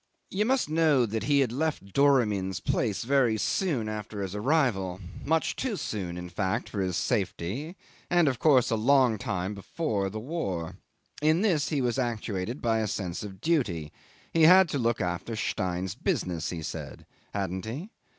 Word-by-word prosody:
'You 205 Hz, +3 st, +1 dB
must 260 Hz, -, +2 dB
know 155 Hz, -5 st, +3 dB
he 115 Hz, +6 st, +1 dB
had 125 Hz, -4 st, +1 dB
left 135 Hz, -8 st, -2 dB
Doramin's 105 Hz, -10 st, +3 dB
place 110 Hz, -4 st, 0 dB
very 125 Hz, -3 st, +3 dB
soon 135 Hz, -, 0 dB
after 105 Hz, -1 st, -4 dB
his 95 Hz, -1 st, -4 dB
arrival 105 Hz, -, +1 dB, 0.2 s
much 160 Hz, +2 st, +1 dB
too 255 Hz, -5 st, -2 dB
soon, 95 Hz, -, -4 dB
in 90 Hz, 0 st, -6 dB
fact, 95 Hz, +2 st, -2 dB
for 100 Hz, -, -3 dB
his 90 Hz, -2 st, -1 dB
safety, 115 Hz, -, -2 dB, 0.3 s
and 175 Hz, -2 st, +4 dB
of 130 Hz, -4 st, 0 dB
course 135 Hz, -7 st, +4 dB
a -, -, +3 dB
long 125 Hz, 0 st, +4 dB
time 105 Hz, -5 st, -2 dB
before 100 Hz, -, -2 dB
the 110 Hz, +3 st, -5 dB
war. 105 Hz, -, -3 dB, 0.4 s
In 155 Hz, +3 st, +3 dB
this 170 Hz, -9 st, +2 dB
he 145 Hz, -4 st, 0 dB
was 125 Hz, +1 st, 0 dB
actuated 115 Hz, -1 st, -3 dB
by 115 Hz, -1 st, +2 dB
a 110 Hz, -, 0 dB
sense 90 Hz, -4 st, -3 dB
of 100 Hz, -2 st, -8 dB
duty; 105 Hz, -, 0 dB, 0.4 s
he 165 Hz, -, +3 dB
had 180 Hz, +3 st, +8 dB
to 140 Hz, -, -1 dB
look 115 Hz, -1 st, +1 dB
after 90 Hz, +6 st, -2 dB
Stein's 95 Hz, -4 st, -2 dB
business, 85 Hz, -3 st, -1 dB
he 85 Hz, -3 st, -5 dB
said. -, -, -7 dB, 0.3 s
Hadn't 95 Hz, -1 st, -3 dB
he? 145 Hz, -, -6 dB
115 Hz, 170 wpm, -28 LUFS, 95-145 Hz, 0.4 s, had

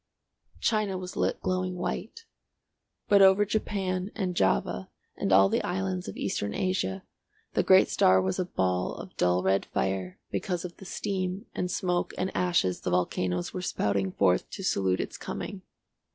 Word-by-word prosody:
China 215 Hz, -4 st, +1 dB
was 185 Hz, 0 st, -7 dB
lit -, -, 0 dB
glowing 185 Hz, 0 st, -1 dB
white, 455 Hz, -, -4 dB, 0.8 s
but 200 Hz, -1 st, +6 dB
over 195 Hz, +2 st, +6 dB
Japan 195 Hz, -3 st, -1 dB
and 185 Hz, -3 st, -1 dB
Java 95 Hz, -, +1 dB, 0.3 s
and 100 Hz, -, -2 dB
all 95 Hz, +1 st, +7 dB
the -, -, +1 dB
islands 95 Hz, -1 st, -2 dB
of -, -, -6 dB
Eastern 100 Hz, 0 st, -2 dB
Asia 95 Hz, -, -1 dB, 0.5 s
the -, -, +3 dB
great -, -, +6 dB
star 95 Hz, 0 st, +4 dB
was 95 Hz, 0 st, -1 dB
a 185 Hz, -, +1 dB
ball 90 Hz, -, -1 dB
of -, -, -10 dB
dull 90 Hz, +1 st, +2 dB
red 95 Hz, +1 st, +2 dB
fire 95 Hz, -1 st, -2 dB
because 180 Hz, -2 st, -2 dB
of 175 Hz, -, -7 dB
the 195 Hz, -, -11 dB
steam 190 Hz, +2 st, -3 dB
and 180 Hz, -, -2 dB
smoke 180 Hz, 0 st, -1 dB
and 185 Hz, +1 st, -2 dB
ashes 170 Hz, -, +1 dB
the -, -, -2 dB
volcanoes 90 Hz, 0 st, 0 dB
were 185 Hz, -, -3 dB
spouting 100 Hz, -, 0 dB
forth 90 Hz, -1 st, +2 dB
to 195 Hz, -, -7 dB
salute 95 Hz, -, +1 dB
its -, -, -4 dB
coming. 195 Hz, -, -5 dB
175 Hz, 165 wpm, -28 LUFS, -, 0.8 s, all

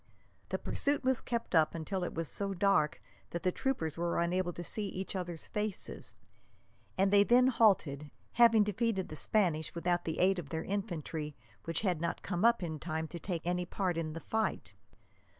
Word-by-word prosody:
The -, -, -1 dB
pursuit 285 Hz, 0 st, 0 dB
was 260 Hz, -1 st, +3 dB
kept 235 Hz, -2 st, -3 dB
up 160 Hz, -1 st, +4 dB
until 180 Hz, +3 st, -3 dB
it -, -, -4 dB
was 165 Hz, -1 st, -2 dB
so 195 Hz, +3 st, -1 dB
dark 185 Hz, -5 st, +2 dB, 0.3 s
that 170 Hz, -, -5 dB
the 185 Hz, -, +2 dB
troopers 165 Hz, -, -2 dB
were 170 Hz, 0 st, 0 dB
unable 175 Hz, +1 st, 0 dB
to 175 Hz, -, -7 dB
see 205 Hz, +4 st, 0 dB
each 190 Hz, +1 st, -5 dB
other's 175 Hz, -3 st, -3 dB
faces, 210 Hz, -2 st, -4 dB, 0.8 s
and 195 Hz, +1 st, +3 dB
they 200 Hz, 0 st, +7 dB
then 250 Hz, +4 st, +5 dB
halted, 170 Hz, -, +2 dB, 0.2 s
having 230 Hz, -3 st, +6 dB
defeated 210 Hz, -1 st, -1 dB
the 155 Hz, -, -6 dB
Spanish 165 Hz, -3 st, +1 dB
without 175 Hz, +1 st, 0 dB
the 160 Hz, -, -2 dB
aid 185 Hz, +1 st, +3 dB
of 150 Hz, -5 st, -7 dB
their 160 Hz, +2 st, -3 dB
infantry, 165 Hz, -7 st, -4 dB, 0.3 s
which 165 Hz, -2 st, -1 dB
had 180 Hz, -6 st, 0 dB
not 170 Hz, -, -2 dB
come 180 Hz, 0 st, -2 dB
up 235 Hz, -4 st, +4 dB
in 160 Hz, -3 st, -4 dB
time 160 Hz, +1 st, -3 dB
to 170 Hz, -, -7 dB
take 170 Hz, -2 st, -4 dB
any 180 Hz, 0 st, -1 dB
part 185 Hz, -2 st, -1 dB
in 160 Hz, -2 st, -3 dB
the 165 Hz, -, -5 dB
fight. 220 Hz, +5 st, -2 dB
180 Hz, 185 wpm, -32 LUFS, 165-205 Hz, 0.8 s, they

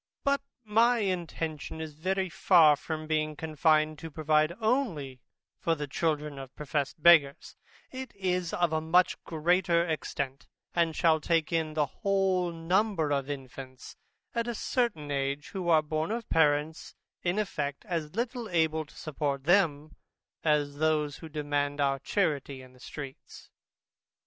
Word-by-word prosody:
But 280 Hz, 0 st, +2 dB, 0.2 s
my 230 Hz, +3 st, +3 dB
intention 165 Hz, -6 st, -3 dB
is 160 Hz, -1 st, -6 dB
very 190 Hz, +5 st, -1 dB
far 165 Hz, -3 st, +5 dB
from 155 Hz, +2 st, -5 dB
being 155 Hz, -1 st, -1 dB
confined 155 Hz, 0 st, +1 dB
to 165 Hz, -, -7 dB
provide 155 Hz, 0 st, +2 dB
only 200 Hz, -, -1 dB, 0.4 s
for 165 Hz, -, +1 dB
the 150 Hz, -1 st, -4 dB
children 150 Hz, 0 st, -2 dB
of 135 Hz, -1 st, -10 dB
professed 150 Hz, +1 st, -3 dB
beggars: 155 Hz, -5 st, +5 dB, 0.4 s
it 260 Hz, -1 st, -7 dB
is 180 Hz, -3 st, -1 dB
of 175 Hz, -2 st, +1 dB
a 155 Hz, -, +1 dB
much 175 Hz, +3 st, +2 dB
greater 170 Hz, +1 st, +2 dB
extent, 140 Hz, -4 st, -4 dB, 0.3 s
and 165 Hz, -2 st, +1 dB
shall 160 Hz, -2 st, +3 dB
take 165 Hz, -1 st, +1 dB
in 160 Hz, -2 st, 0 dB
the 150 Hz, -1 st, +2 dB
whole 190 Hz, +1 st, 0 dB
number 170 Hz, 0 st, 0 dB
of 140 Hz, -1 st, 0 dB
infants 130 Hz, -2 st, -8 dB, 0.4 s
at 235 Hz, 0 st, -1 dB
a 240 Hz, -, -2 dB
certain 215 Hz, -, -1 dB
age, 140 Hz, +1 st, -2 dB
who 185 Hz, -3 st, -3 dB
are 160 Hz, -2 st, +5 dB
born 155 Hz, +2 st, -2 dB
of 230 Hz, +1 st, -3 dB
parents 150 Hz, 0 st, +1 dB, 0.3 s
in 175 Hz, +2 st, 0 dB
effect 145 Hz, -9 st, -3 dB
as 165 Hz, -4 st, -3 dB
little 235 Hz, 0 st, -3 dB
able 160 Hz, -2 st, +1 dB
to -, -, -19 dB
support 140 Hz, -3 st, -3 dB
them, 155 Hz, -3 st, +2 dB, 0.5 s
as 145 Hz, -2 st, +1 dB
those 155 Hz, -2 st, +1 dB
who 160 Hz, -, -10 dB
demand 145 Hz, -1 st, -2 dB
our 135 Hz, -1 st, +1 dB
charity 140 Hz, -7 st, -1 dB
in 130 Hz, 0 st, -16 dB
the 125 Hz, -, -20 dB
streets. 135 Hz, 0 st, -10 dB
155 Hz, 150 wpm, -29 LUFS, 145-180 Hz, 0.5 s, far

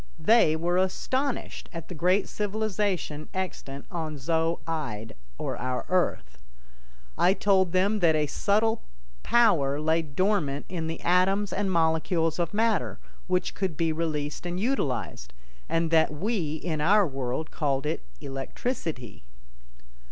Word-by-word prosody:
They 220 Hz, -9 st, +4 dB
were 175 Hz, +2 st, 0 dB
astonished 255 Hz, +8 st, -1 dB
at 165 Hz, -2 st, -7 dB
the -, -, -7 dB
great 180 Hz, +5 st, +2 dB
civilization 205 Hz, -7 st, -2 dB
extant 140 Hz, -7 st, -4 dB
on 160 Hz, -4 st, -4 dB
Zo 165 Hz, +4 st, 0 dB
ide, 125 Hz, -10 st, -4 dB, 0.2 s
or -, -, -3 dB
our 125 Hz, 0 st, -2 dB
Earth. 60 Hz, -, 0 dB, 0.8 s
I 185 Hz, +2 st, +5 dB
told 190 Hz, -4 st, +3 dB
them 195 Hz, +4 st, +2 dB
that 165 Hz, -4 st, +4 dB
a 150 Hz, -1 st, +2 dB
subtile 215 Hz, +8 st, +1 dB, 0.4 s
power 155 Hz, -, +3 dB
lay 160 Hz, +2 st, +2 dB
dormant 155 Hz, -2 st, 0 dB
in 170 Hz, -3 st, -3 dB
the 165 Hz, 0 st, -5 dB
atoms 190 Hz, +3 st, +2 dB
and 195 Hz, -1 st, 0 dB
molecules 165 Hz, 0 st, +1 dB
of 170 Hz, -, 0 dB
matter, 205 Hz, -, +1 dB, 0.3 s
which 180 Hz, 0 st, 0 dB
could 185 Hz, -6 st, -2 dB
be 165 Hz, -1 st, +1 dB
released 155 Hz, 0 st, -2 dB
and 175 Hz, +1 st, -3 dB
utilized, 125 Hz, -, -2 dB, 0.3 s
and 165 Hz, 0 st, +1 dB
that 160 Hz, -2 st, +4 dB
we 165 Hz, -1 st, -1 dB
in 160 Hz, -1 st, -3 dB
our 200 Hz, +6 st, +5 dB
world 135 Hz, +1 st, -3 dB
called 140 Hz, -2 st, -1 dB
it 155 Hz, -, -1 dB, 0.2 s
"electricity." 135 Hz, -, -4 dB
165 Hz, 135 wpm, -27 LUFS, 150-195 Hz, 0.8 s, I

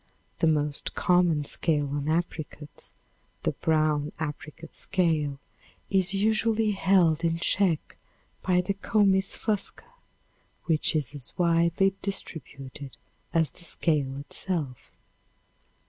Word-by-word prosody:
The 165 Hz, -, +3 dB
most 150 Hz, -2 st, 0 dB
common 175 Hz, -4 st, +3 dB
scale 145 Hz, -1 st, 0 dB
on 145 Hz, +1 st, -2 dB
apricots, 155 Hz, -3 st, -4 dB, 0.5 s
the -, -, +1 dB
brown 155 Hz, -2 st, +1 dB
apricot 155 Hz, +1 st, -6 dB
scale, 155 Hz, -6 st, 0 dB, 0.5 s
is 190 Hz, 0 st, +3 dB
usually 220 Hz, +1 st, +2 dB
held 180 Hz, -5 st, +3 dB
in 165 Hz, 0 st, +1 dB
check 170 Hz, -1 st, 0 dB, 0.4 s
by 180 Hz, -1 st, +2 dB
the 180 Hz, +2 st, -1 dB
comys 195 Hz, -1 st, +2 dB
fusca, 215 Hz, -, -2 dB, 0.8 s
which 160 Hz, -1 st, +2 dB
is 145 Hz, -4 st, -1 dB
as 140 Hz, -4 st, -8 dB
widely 170 Hz, +2 st, +3 dB
distributed 140 Hz, -7 st, -4 dB, 0.3 s
as 160 Hz, -4 st, +2 dB
the 175 Hz, -, -14 dB
scale 145 Hz, -6 st, 0 dB
itself. 145 Hz, -2 st, -4 dB
165 Hz, 105 wpm, -27 LUFS, 150-190 Hz, 0.8 s, The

